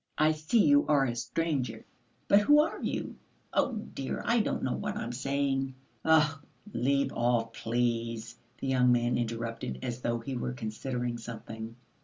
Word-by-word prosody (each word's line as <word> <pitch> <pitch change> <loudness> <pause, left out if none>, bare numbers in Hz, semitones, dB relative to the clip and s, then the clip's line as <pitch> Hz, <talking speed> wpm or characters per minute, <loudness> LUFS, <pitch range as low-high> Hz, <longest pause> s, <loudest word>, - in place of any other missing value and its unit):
I 155 +1 +5
see 155 +9 +2
you 285 0 +5
are 145 -2 +4
a 120 -2 -2
stranger, 125 -2 -2 0.4
but 200 - +7
who 295 +8 +6
are 315 +2 +1
you? - - -3 0.4
Oh, 260 - +2
dear, 140 -10 -4
I 235 0 +3
don't 215 - 0
know 130 - 0
what - - -3
I - - -2
am 120 - -4
saying!" 135 +1 -1 0.3
"Ugh, 155 -2 +4 0.3
leave 140 +3 +1
off, 120 -1 +1
please!" 115 -1 -1 0.2
the - - -6
young 125 -2 +4
man 120 0 +2
interrupted, 115 - -3
as 120 0 -4
though 120 -1 0
he 130 +3 -5
were 125 0 -2
considering 120 +1 -3
something. 110 0 -7
125 Hz, 165 wpm, -30 LUFS, 115-145 Hz, 0.4 s, but